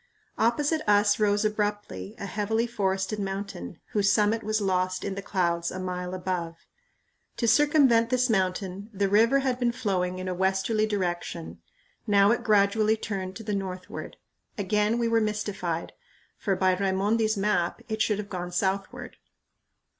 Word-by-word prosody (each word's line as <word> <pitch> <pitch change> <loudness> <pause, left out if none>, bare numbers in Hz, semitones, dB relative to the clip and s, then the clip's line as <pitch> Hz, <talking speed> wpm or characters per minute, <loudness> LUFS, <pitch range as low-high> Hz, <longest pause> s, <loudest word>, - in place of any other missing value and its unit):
Opposite 290 +8 +2
us 205 0 +4
rose 210 0 +2
abruptly 210 0 -2
a - - -6
heavily 210 +4 -1
forested 195 -2 -1
mountain, 195 - -5
whose 200 -1 +2
summit 215 +2 +2
was 215 0 0
lost 185 -2 0
in 200 - -2
the 195 - -5
clouds 170 -3 0
a - - -6
mile 180 0 -4
above. 180 -3 -3 0.8
To 235 - 0
circumvent 260 -3 +4
this 255 0 +2
mountain 190 -1 -1
the 200 -1 0
river 230 +7 +4
had 255 -2 -1
been 240 -1 +2
flowing 185 -5 -1
in 185 0 -5
a 185 - -1
westerly 190 +4 +1
direction; 175 -4 -3 0.5
now 200 0 +5
it 240 0 0
gradually 215 0 +3
turned 190 -4 -4
to 225 - -8
the 210 -1 -3
northward. 185 -2 -5 0.4
Again 210 +2 +1
we 235 -1 +1
were 230 0 +3
mystified; 205 -6 -2 0.4
for, 195 -3 -1
by 185 0 +2
Raimondi's 205 +3 +1
map, 195 -4 0
it 220 -1 -3
should 210 -2 +2
have 205 -1 -5
gone 180 -2 -5
southward. 190 +2 -2
205 Hz, 155 wpm, -27 LUFS, 185-220 Hz, 0.8 s, now